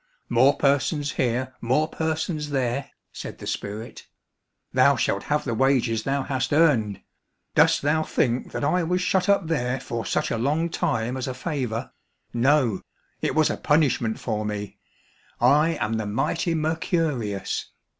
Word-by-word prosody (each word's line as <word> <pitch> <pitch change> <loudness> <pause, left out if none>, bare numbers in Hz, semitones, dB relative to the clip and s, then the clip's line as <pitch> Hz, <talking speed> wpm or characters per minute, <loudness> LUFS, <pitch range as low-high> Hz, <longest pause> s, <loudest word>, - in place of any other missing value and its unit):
"More 130 +4 +4
persons 145 +1 +1
here, 130 +1 -1
more 130 +7 +2
persons 160 -1 -2
there," 135 0 -1 0.2
said - - -8
the - - -9
spirit. 105 +3 -5 0.7
"Thou - - +5
shalt 100 - -1
have 150 0 0
the 120 - -1
wages 125 -2 +2
thou 135 +3 -1
hast 130 -2 -2
earned. 135 - +3 0.5
Dost - - +4
thou 155 +2 +2
think 125 -5 0
that - - -4
I 180 +5 +2
was 180 +2 0
shut 185 +1 +1
up 200 -3 +3
there 135 -5 -1
for 115 -2 -4
such - - -1
a 115 - -1
long 155 +7 0
time 120 -1 -1
as 130 - -3
a 130 - -4
favour. 130 -6 -3 0.4
No, 120 -4 +2 0.4
it - - -1
was 155 -1 +3
a - - -3
punishment 140 -7 +1
for 110 -3 -2
me. 105 -1 -5 0.6
I 155 +3 +4
am 105 0 -1
the 110 -2 -3
mighty 165 - 0
Mercurius. 155 - -1
135 Hz, 155 wpm, -24 LUFS, 115-155 Hz, 0.7 s, Thou